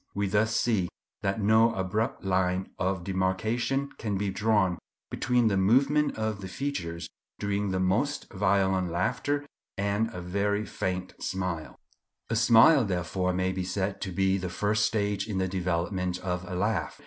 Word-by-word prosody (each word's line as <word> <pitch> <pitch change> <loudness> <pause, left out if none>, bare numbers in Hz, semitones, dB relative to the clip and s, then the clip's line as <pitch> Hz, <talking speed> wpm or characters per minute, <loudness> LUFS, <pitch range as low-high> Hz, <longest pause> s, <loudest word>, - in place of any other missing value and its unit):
We 100 0 0
thus 105 +3 +1
see 105 -8 +1 0.3
that 100 +2 -1
no 110 +2 +4
abrupt 95 +5 -1
line 95 0 0
of 95 -1 -1
demarcation 110 +9 0
can 105 -4 -2
be 100 0 -1
drawn 100 -3 +1 0.3
between 120 0 +2
the 100 -3 +2
movement 135 +10 +3
of 110 -2 -2
the 95 - -5
features 90 -8 -4 0.3
during 100 0 -1
the 95 0 -1
most 105 +11 0
violent 95 -2 +2
laughter 125 +11 -1 0.3
and 100 +3 0
a 90 - -6
very 100 +4 -1
faint 90 -2 -3
smile. 90 -4 -3 0.6
A - - +2
smile, 115 +5 +6
therefore, 90 -1 -1
may 95 +1 0
be 95 0 -3
said 95 +1 -2
to 95 - -3
be 95 +2 +1
the 90 -1 -3
first 105 +3 +1
stage 105 -2 -1
in 105 -3 -3
the 95 0 +1
development 90 0 -1
of 90 -1 -3
a 90 - -4
laugh. 95 +1 -1
100 Hz, 160 wpm, -28 LUFS, 95-110 Hz, 0.6 s, smile